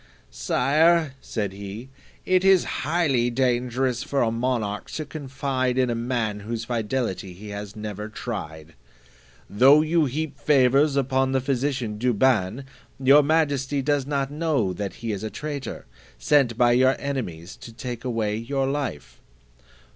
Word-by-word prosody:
"Sire," 155 - +2
said 105 -4 -3
he, 100 +5 -8 0.4
"it 185 0 +3
is 190 -2 +5 0.2
highly 145 -7 +1
dangerous 125 0 0
for 140 -2 0
a 115 - +1
monarch 115 -3 -2
to 155 - -4
confide 130 -3 -2
in 130 -2 +2
a - - 0
man 115 -3 -2
whose 115 +2 -5
fidelity 115 -5 -2
he 105 +4 -10
has 100 +1 -7
never 105 0 -6
tried. 85 -9 -7 0.7
Though 135 +8 +6
you 160 0 +2
heap 145 +2 -4
favours 140 0 +3
upon 135 -1 +1
the 135 - +3
physician 130 -4 -2
Douban, 120 -1 +1 0.4
your 135 +2 +6
majesty 145 -3 +1
does 145 -1 0
not 140 -1 -1
know 145 - 0
that 95 0 -5
he 115 - -1
is 100 -2 -4
a 110 - -3
traitor, 145 -3 -6 0.3
sent 125 - +2
by 120 -1 +4
your 130 +2 +4
enemies 95 - -5
to 115 - -11
take 120 +1 -6
away 115 -4 -1
your 135 +4 -1
life." 135 - -4
125 Hz, 145 wpm, -24 LUFS, 110-140 Hz, 0.7 s, Though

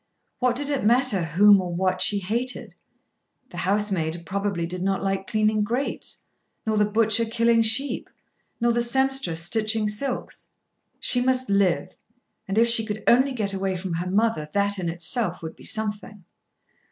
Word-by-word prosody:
What 250 -1 +1
did 290 +3 -3
it 280 - -1
matter 235 -3 +2
whom 195 +5 +5
or 175 -2 -4
what 185 +1 0
she 205 - +3
hated? 230 +7 -3 0.8
The 175 - -9
housemaid 180 -4 -1
probably 195 -1 -2
did 180 +1 -6
not 195 0 -1
like 195 0 -2
cleaning 215 -1 +1
grates; 240 +6 -2 0.4
nor 220 -1 0
the 210 0 +2
butcher 220 +1 +3
killing 230 0 +2
sheep; 225 +6 -1 0.5
nor 235 0 +2
the 240 0 +1
sempstress 265 -9 +1
stitching 215 +3 0
silks. 245 +5 -4 0.5
She 245 - 0
must 255 -2 +1
live. 200 -3 +2 0.6
And 195 +2 -3
if 230 +1 +5
she 230 -1 +3
could 215 -1 -5
only 260 +3 +4
get 210 -5 -2
away 190 -1 -2
from 180 -1 -5
her 175 +2 -3
mother 200 -6 0
that 200 0 0
in 175 -2 -2
itself 175 +2 -2
would 160 - -6
be - - -10
something. 210 -2 -3
210 Hz, 165 wpm, -24 LUFS, 190-235 Hz, 0.8 s, whom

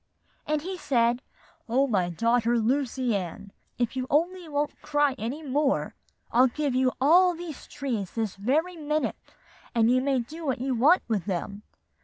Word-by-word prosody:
"And 305 -1 0
he 370 +1 -5
said, 240 -4 +2 0.5
'O 260 +4 +3
my 190 -9 +1
daughter 230 +6 +2
Lucy 255 0 0
Ann, 200 +2 -5 0.3
if 240 0 -1
you 255 0 -2
only 345 +3 0
won't 290 0 -2
cry 290 -2 +2
any 260 +8 -4
more, 280 0 0 0.4
I'll 250 +3 +5
give 285 +2 -2
you 255 0 +2
all 350 +6 +5
those 330 -4 -8
trees 235 -10 -3
this 220 -4 -2
very 300 - 0
minute; 305 -1 -1 0.6
and 230 0 +4
you 255 +1 +3
may 270 -1 +1
do 310 +8 -7
what 270 -4 -1
you 260 +1 -1
want 285 +10 +5
to - - -40
with 205 -6 0
them. 200 +1 -3
260 Hz, 170 wpm, -27 LUFS, 230-300 Hz, 0.6 s, I'll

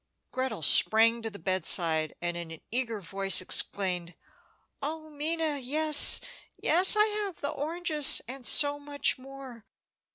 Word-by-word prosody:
Gretel 255 -9 -6
sprang 225 +8 +3
to 225 - -7
the 200 - -14
bedside, 170 -4 -2
and 175 0 -5
in 170 -1 -9
an 165 -1 -14
eager 235 -2 -4
voice 195 +2 0
exclaimed: 180 -2 -3 0.7
"Oh, 310 +2 -8
Minna, 305 0 -3
yes, 300 +3 +5 0.4
yes, 360 +6 +6
I 425 0 +2
have 415 -4 -6
the 285 - -4
oranges, 310 0 +1
and 260 +1 -9
so 290 +3 +1
much 285 -1 -2
more! 265 -3 -14
265 Hz, 135 wpm, -25 LUFS, 195-305 Hz, 0.7 s, yes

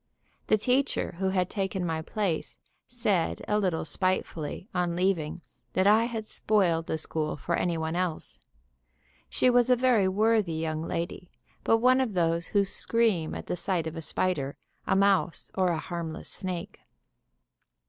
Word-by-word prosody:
The 215 - +4
teacher 255 +6 +1
who 190 0 +1
had 185 -2 +1
taken 190 -2 -2
my 160 -1 -1
place 180 -1 -2 0.3
said 215 -9 0
a 210 0 +2
little 180 -6 0
spitefully, 185 -2 -2
on 175 -2 0
leaving, 175 -3 0 0.3
that 185 - +2
I 215 +3 +5
had 225 -2 -4
spoiled 180 -7 +1
the 160 - -1
school 155 -1 -2
for 170 +4 -1
any 175 -2 0
one 160 +1 -2
else. 180 -3 -2 0.9
She - - +2
was 245 0 +4
a 250 - +6
very 245 -5 +3
worthy 210 -2 +2
young 160 -1 -2
lady, 170 +2 -4 0.3
but 225 - +4
one 255 +3 +4
of 240 -5 -1
those 170 -1 +1
who 200 -1 +2
scream 205 -5 +1
at - - -6
the - - -2
sight 175 -1 -1
of 160 0 -5
a 165 - -5
spider, 150 -4 -1 0.3
a - - +3
mouse 195 -3 +2
or 185 -1 +2
a 170 -2 +1
harmless 165 -1 -5
snake. 185 +1 -5
185 Hz, 160 wpm, -28 LUFS, 165-210 Hz, 0.9 s, a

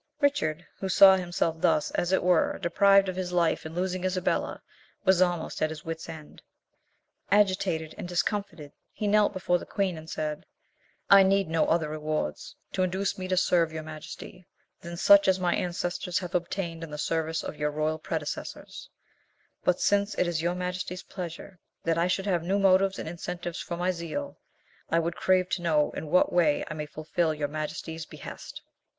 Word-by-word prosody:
Richard, 175 - +1
who 190 - -3
saw 190 0 +8
himself 175 -3 -1
thus, 165 -4 +2
as 175 - -1
it 190 - +2
were, 180 -2 +3
deprived 195 +2 +4
of 185 - -3
his 185 -1 -3
life 170 -2 +1
in 160 - -10
losing 185 0 -2
Isabella, 185 -1 -1 0.4
was 190 -1 +4
almost 175 -2 0
at 155 - +2
his 155 -1 -8
wits' 165 0 -5
end. 155 -2 -10 0.9
Agitated 185 -5 +2
and - - -5
discomfited, 175 -4 -2 0.2
he 210 - -3
knelt 210 0 +4
before 180 -2 0
the - - -9
queen, 190 -5 -1
and 160 +1 -12
said, 150 -1 -4 0.6
"I 200 0 +10
need 195 -1 +3
no 160 -1 +2
other 165 -2 +2
rewards 155 - -3 0.2
to - - -1
induce 190 +2 -1
me 185 - -4
to 185 0 0
serve 170 -3 +3
your 160 0 -5
majesty 155 +3 -10 0.3
than 170 0 -8
such 300 - +6
as 190 0 +3
my 180 -1 +1
ancestors 175 0 -2
have 180 -2 -4
obtained 170 -1 -2
in 165 - -7
the 150 - -6
service 160 +1 -1
of - - -5
your 150 0 0
royal 155 +1 -1
predecessors; 155 -2 -5 0.7
but 180 - +2
since 200 +1 +2
it - - +2
is 170 -2 -1
your 175 +1 0
majesty's 180 0 -4
pleasure 180 0 -8 0.2
that 165 0 +1
I 170 - +2
should 190 +1 -1
have 180 -4 +1
new 185 +4 0
motives 195 0 +4
and - - -5
incentives 175 +1 -5
for 170 - -5
my 180 +1 +1
zeal, 175 - -5 0.5
I 165 - +2
would 170 0 0
crave 185 -1 +2
to - - -1
know 155 -3 +2
in 160 - -6
what 180 - +3
way 160 -4 +3
I - - -5
may 150 -1 -5
fulfil 155 +2 -1
your 150 -1 -2
majesty's 155 +1 -5
behest?" - - -9
175 Hz, 185 wpm, -27 LUFS, 160-185 Hz, 0.9 s, I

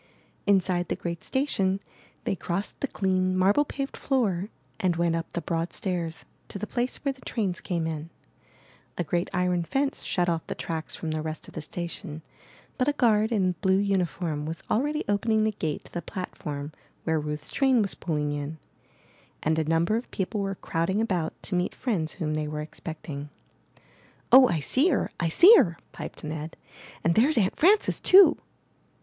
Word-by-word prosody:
Inside 185 -3 +3
the - - -1
great 170 -1 -5
station, 195 -9 +1 0.4
they - - 0
crossed 185 +2 -3
the 280 - -1
clean, 185 -4 0
marble 200 +9 +4
paved 275 -1 -4
floor 210 -8 0 0.3
and 180 -2 +1
went 170 0 +1
up 165 -1 -4
the 170 - -2
broad 165 0 -2
stairs 170 -4 -3 0.2
to - - -6
the 205 - -3
place 245 +3 -1
where 275 - +1
the 260 - -21
trains 195 -6 -2
came 170 -3 -2
in. 160 0 -4 0.9
A 175 - 0
great 175 +2 -1
iron 180 -1 +1
fence 270 - -1
shut 175 -1 0
off 165 -2 +1
the - - -4
tracks 160 -1 -4
from 160 - -4
the 155 0 -2
rest 155 0 -5
of - - -13
the 160 - -5
station, 170 0 -6 0.6
but 255 - +2
a 290 - +3
guard 220 -4 +3
in 190 -5 +2
blue 190 -1 +3
uniform 180 -6 -1
was 160 +1 -6
already 295 +7 +1
opening 215 +2 +2
the 220 - +2
gate 160 -7 -3
to - - -15
the 175 - -3
platform 150 -5 -5 0.3
where 160 -1 +1
Ruth's 150 0 -5
train 265 -3 +3
was 200 - 0
pulling 150 -3 -2
in, 145 +2 -4 0.9
and 155 +1 +2
a 160 - 0
number 165 +7 +2
of 240 - -6
people 200 +2 -2
were 195 0 -2
crowding 180 +3 -1
about 185 -8 0
to - - -1
meet 180 0 0
friends 180 -11 -1
whom 155 -6 -2
they 155 0 -1
were 150 0 -4
expecting. 150 -2 -7 1.0
0h, 255 0 +9
I 165 - +1
see 265 - +3
her! 285 - 0
I 170 - +1
see 360 - +8
her!'' 170 - +3
piped - - -8
Ned, 155 +1 -5 0.5
*'and 165 - +3
there's 260 - +4
Aunt 195 -3 +2
Frances 405 +6 +4
too!" 370 -3 +7
180 Hz, 180 wpm, -27 LUFS, 160-215 Hz, 1.0 s, 0h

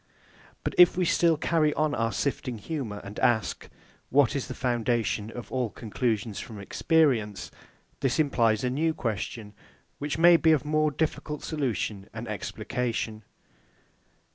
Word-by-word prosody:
But - - -2
if 180 0 +7
we 180 - +2
still 165 -1 +3
carry 155 -1 +1
on 155 -1 +1
our 115 -3 0
sifting 125 +2 -2
humour, 110 -5 -5
and 100 +1 -8
ask, 110 -5 +1 0.4
What 145 +1 +3
is 135 - -2
the - - -6
foundation 120 -3 0
of 120 0 -9
all 125 -3 0
conclusions 110 -1 -2
from 110 -3 -8
experience? 115 - +1 0.5
this 130 -3 0
implies 115 -8 +2
a 125 - 0
new 160 +4 0
question, 110 -2 -4 0.5
which 145 +1 -2
may 170 +1 +7
be 160 -1 +4
of 150 -1 0
more 155 0 +2
difficult 150 0 -3
solution 115 -9 -2
and 115 +1 -6
explication. 110 +1 -3
125 Hz, 140 wpm, -27 LUFS, 110-155 Hz, 0.5 s, if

